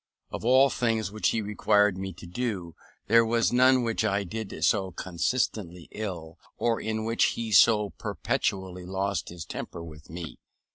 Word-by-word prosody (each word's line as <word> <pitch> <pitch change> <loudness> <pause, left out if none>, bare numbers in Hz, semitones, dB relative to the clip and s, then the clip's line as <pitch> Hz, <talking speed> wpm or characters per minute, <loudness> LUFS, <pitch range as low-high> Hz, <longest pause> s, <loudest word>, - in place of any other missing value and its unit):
Of - - -5
all 130 +3 +5
things 115 -4 0
which 110 +1 +1
he 110 - -1
required 105 -1 +2
me 95 0 -5
to 90 0 -12
do, 90 -3 -4 0.3
there 115 +2 +5
was 115 +1 +1
none 130 0 +5
which 115 -1 0
I 100 -2 +1
did 100 -3 -6
so 95 -3 +2
constantly 90 - -2
ill, 85 -7 -6 0.2
or 115 -1 0
in 110 0 -2
which 115 +1 +2
he 115 -1 -3
so 105 +2 +5
perpetually 90 -2 -3
lost 95 +1 -2
his 85 -2 -8
temper 85 - -6
with 75 -2 -12
me. 85 0 -8
105 Hz, 160 wpm, -27 LUFS, 90-115 Hz, 0.3 s, all